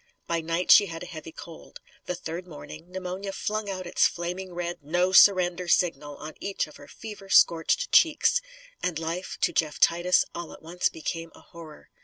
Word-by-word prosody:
By 170 Hz, -1 st, -1 dB
night 165 Hz, +2 st, 0 dB
she 205 Hz, -, +8 dB
had 165 Hz, -1 st, -7 dB
a -, -, -7 dB
heavy 160 Hz, 0 st, -9 dB
cold. 165 Hz, 0 st, -12 dB, 0.3 s
The 180 Hz, -, -2 dB
third 175 Hz, +1 st, -7 dB
morning, 160 Hz, +1 st, -11 dB
pneumonia 185 Hz, +1 st, -5 dB
flung 210 Hz, +1 st, -3 dB
out 185 Hz, -1 st, -5 dB
its 175 Hz, -, +3 dB
flaming 180 Hz, +2 st, -5 dB
red 175 Hz, 0 st, -4 dB
No 175 Hz, +5 st, 0 dB
Surrender 180 Hz, -2 st, +5 dB
signal 150 Hz, -5 st, +1 dB
on 155 Hz, +1 st, -8 dB
each 200 Hz, -, -2 dB
of 150 Hz, -, -15 dB
her 145 Hz, -, -14 dB
fever 210 Hz, -3 st, -10 dB
scorched 185 Hz, -, +3 dB
cheeks. 330 Hz, +9 st, +4 dB, 0.4 s
And 175 Hz, -3 st, -2 dB
life, 165 Hz, +3 st, -4 dB
to -, -, +1 dB
Jeff 155 Hz, -2 st, 0 dB
Titus, 175 Hz, +2 st, +3 dB
all 170 Hz, -1 st, -7 dB
at -, -, -15 dB
once 175 Hz, +3 st, -1 dB
became 165 Hz, +1 st, -5 dB
a -, -, -16 dB
horror. 165 Hz, -3 st, -14 dB
175 Hz, 185 wpm, -26 LUFS, 165-185 Hz, 0.4 s, she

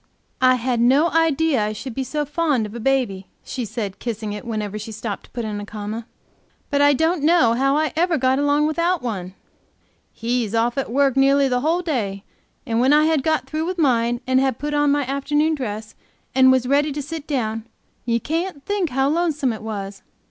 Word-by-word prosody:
"I 255 Hz, 0 st, +5 dB
had 245 Hz, 0 st, -1 dB
no 275 Hz, +8 st, +4 dB
idea 320 Hz, -6 st, +2 dB
I 210 Hz, +1 st, -2 dB
should 250 Hz, +3 st, -7 dB
be 265 Hz, -, -2 dB
so 295 Hz, +3 st, -2 dB
fond 295 Hz, -6 st, 0 dB
of 210 Hz, -, -8 dB
a 235 Hz, -, -6 dB
baby," 235 Hz, -7 st, 0 dB, 0.2 s
she 250 Hz, -, -4 dB
said, 205 Hz, -2 st, -5 dB
kissing 220 Hz, -3 st, -4 dB
it, 210 Hz, -, -7 dB
whenever 215 Hz, -2 st, -3 dB
she 215 Hz, +2 st, -7 dB
stopped 215 Hz, -1 st, -5 dB
to -, -, -23 dB
put 235 Hz, -2 st, -5 dB
in 210 Hz, -1 st, -4 dB
a -, -, -6 dB
comma; 215 Hz, +2 st, -6 dB, 0.6 s
"but 285 Hz, 0 st, +2 dB
I 285 Hz, 0 st, +6 dB
don't 320 Hz, +3 st, +1 dB
know 310 Hz, -6 st, +4 dB
how 275 Hz, +4 st, +2 dB
I 310 Hz, 0 st, 0 dB
ever 335 Hz, 0 st, +2 dB
got 260 Hz, 0 st, +2 dB
along 290 Hz, +1 st, +2 dB
without 335 Hz, +2 st, 0 dB
one. 190 Hz, -6 st, -4 dB, 0.8 s
He's 230 Hz, -2 st, -2 dB
off 235 Hz, +1 st, +1 dB
at 265 Hz, -, -3 dB
work 275 Hz, 0 st, +2 dB
nearly 275 Hz, +1 st, +4 dB
the 250 Hz, -1 st, 0 dB
whole 330 Hz, +5 st, +1 dB
day, 205 Hz, -, -2 dB, 0.4 s
and 230 Hz, -3 st, 0 dB
when 260 Hz, +4 st, +4 dB
I 305 Hz, +1 st, +5 dB
had 315 Hz, -3 st, +2 dB
got 315 Hz, +2 st, 0 dB
through 315 Hz, +1 st, -3 dB
with 365 Hz, 0 st, -3 dB
mine, 240 Hz, -5 st, +2 dB
and 260 Hz, 0 st, +3 dB
had 265 Hz, -3 st, +1 dB
put 295 Hz, +2 st, -4 dB
on 290 Hz, -1 st, +3 dB
my 285 Hz, -1 st, +1 dB
afternoon 295 Hz, +4 st, 0 dB
dress, 220 Hz, -6 st, -5 dB, 0.4 s
and 260 Hz, 0 st, +6 dB
was 260 Hz, -1 st, +2 dB
ready 285 Hz, +3 st, +2 dB
to 295 Hz, -, -3 dB
sit 315 Hz, +1 st, -7 dB
down, 225 Hz, -5 st, -2 dB, 0.4 s
you 235 Hz, -1 st, 0 dB
can't 325 Hz, -, -3 dB
think 405 Hz, -5 st, -1 dB
how 270 Hz, +1 st, +1 dB
lonesome 305 Hz, -5 st, 0 dB
it 220 Hz, -, -8 dB
was. 200 Hz, -2 st, -6 dB
265 Hz, 210 wpm, -21 LUFS, 225-300 Hz, 0.8 s, I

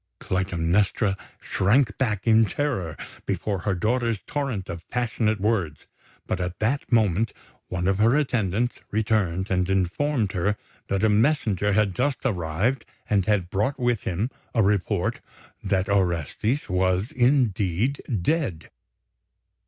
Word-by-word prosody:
Clytemnestra 95 Hz, +3 st, +1 dB, 0.2 s
shrank 105 Hz, +3 st, +2 dB
back 110 Hz, -7 st, 0 dB
in 115 Hz, -1 st, +5 dB
terror 100 Hz, -, -2 dB, 0.3 s
before 100 Hz, -3 st, -1 dB
her 95 Hz, +3 st, -1 dB
daughter's 115 Hz, +3 st, 0 dB
torrent 135 Hz, -10 st, -3 dB
of 85 Hz, -1 st, -8 dB
passionate 110 Hz, -3 st, 0 dB
words; 95 Hz, -7 st, -1 dB, 0.4 s
but -, -, -2 dB
at 90 Hz, 0 st, -3 dB
that 130 Hz, +7 st, -1 dB
moment 110 Hz, -2 st, +2 dB, 0.3 s
one 90 Hz, 0 st, -2 dB
of 95 Hz, +1 st, +1 dB
her 115 Hz, +6 st, +4 dB
attendants 120 Hz, -5 st, 0 dB
returned 105 Hz, -4 st, 0 dB
and 90 Hz, 0 st, +1 dB
informed 100 Hz, -, +1 dB
her 100 Hz, +2 st, 0 dB, 0.3 s
that 100 Hz, +1 st, -1 dB
a 110 Hz, -, +5 dB
messenger 105 Hz, -, +2 dB
had 105 Hz, -2 st, +2 dB
just 130 Hz, +5 st, 0 dB
arrived 100 Hz, +4 st, 0 dB, 0.3 s
and 100 Hz, -3 st, +2 dB
had 95 Hz, -5 st, +1 dB
brought 110 Hz, +8 st, 0 dB
with 120 Hz, -3 st, +1 dB
him 100 Hz, +9 st, -2 dB, 0.2 s
a 115 Hz, -, +4 dB
report 100 Hz, -3 st, 0 dB, 0.4 s
that 95 Hz, 0 st, +1 dB
Orestes 100 Hz, -, 0 dB
was 95 Hz, +3 st, +1 dB
indeed 120 Hz, -, +1 dB, 0.2 s
dead. 115 Hz, -, -1 dB
105 Hz, 130 wpm, -25 LUFS, 95-120 Hz, 0.4 s, in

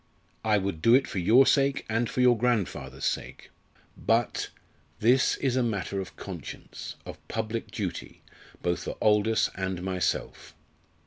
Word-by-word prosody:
I 110 Hz, -1 st, +3 dB
would 95 Hz, -5 st, -2 dB
do 115 Hz, +6 st, +6 dB
it 135 Hz, -, +4 dB
for 95 Hz, -, -4 dB
your 115 Hz, +10 st, +6 dB
sake 140 Hz, 0 st, +2 dB
and 115 Hz, +1 st, 0 dB
for 125 Hz, -, -1 dB
your 125 Hz, -1 st, +6 dB
grandfather's 115 Hz, -4 st, -1 dB
sake. -, -, -3 dB, 0.4 s
But 115 Hz, 0 st, 0 dB, 0.5 s
this 125 Hz, +4 st, +4 dB
is 130 Hz, -3 st, 0 dB
a 130 Hz, -, +3 dB
matter 100 Hz, -4 st, -1 dB
of 95 Hz, -, -9 dB
conscience, 90 Hz, -8 st, -8 dB
of -, -, -8 dB
public 110 Hz, +1 st, -3 dB
duty, -, -, -5 dB, 0.4 s
both 85 Hz, 0 st, -1 dB
for -, -, -5 dB
Aldous 105 Hz, +1 st, +3 dB
and 95 Hz, -2 st, -3 dB
myself. 95 Hz, -1 st, -2 dB
110 Hz, 145 wpm, -28 LUFS, 95-120 Hz, 0.5 s, do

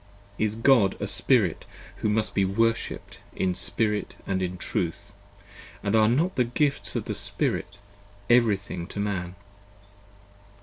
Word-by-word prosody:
Is 110 Hz, 0 st, +1 dB
God 115 Hz, -4 st, +4 dB
a -, -, -2 dB
Spirit -, -, +2 dB, 0.3 s
who 110 Hz, -, -1 dB
must 110 Hz, +1 st, 0 dB
be 100 Hz, -, +2 dB
worshipped 115 Hz, +4 st, -1 dB, 0.2 s
in 90 Hz, -1 st, 0 dB
Spirit 105 Hz, +3 st, -1 dB
& -, -, -27 dB
in 95 Hz, -1 st, -2 dB
Truth, 85 Hz, -1 st, -3 dB, 0.7 s
and 100 Hz, +2 st, +1 dB
are 110 Hz, -1 st, +5 dB
not 160 Hz, +10 st, +1 dB
the 125 Hz, -, +4 dB
Gifts 140 Hz, +4 st, 0 dB
of -, -, -2 dB
the -, -, -3 dB
Spirit 100 Hz, -, -2 dB, 0.5 s
Every 120 Hz, -4 st, +5 dB
thing 95 Hz, -3 st, -7 dB
to 100 Hz, -, -7 dB
Man? 95 Hz, -3 st, -2 dB
105 Hz, 140 wpm, -26 LUFS, 95-115 Hz, 0.7 s, are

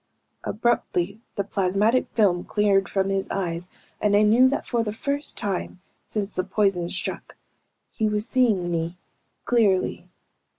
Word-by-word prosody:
Abruptly 210 Hz, -3 st, -1 dB
the 200 Hz, -, 0 dB
plasmatic 200 Hz, +5 st, +1 dB
film 185 Hz, -6 st, +3 dB
cleared 200 Hz, -2 st, +2 dB
from 195 Hz, -1 st, 0 dB
his 195 Hz, 0 st, -1 dB
eyes 175 Hz, -2 st, -3 dB, 0.3 s
and 205 Hz, -1 st, +3 dB
I 210 Hz, -, +5 dB
knew 235 Hz, +5 st, +6 dB
that 280 Hz, -, -2 dB
for 235 Hz, -2 st, +1 dB
the 215 Hz, -2 st, -2 dB
first 280 Hz, +6 st, -2 dB
time, 195 Hz, -2 st, -3 dB, 0.3 s
since 210 Hz, -1 st, -2 dB
the 185 Hz, -, -2 dB
poison 195 Hz, -3 st, 0 dB
struck, -, -, -5 dB, 0.6 s
he 220 Hz, -2 st, 0 dB
was 210 Hz, +2 st, -1 dB
seeing 215 Hz, -9 st, +2 dB
me, 170 Hz, +1 st, -2 dB, 0.5 s
clearly. 210 Hz, -6 st, +1 dB
205 Hz, 140 wpm, -24 LUFS, 185-220 Hz, 0.6 s, knew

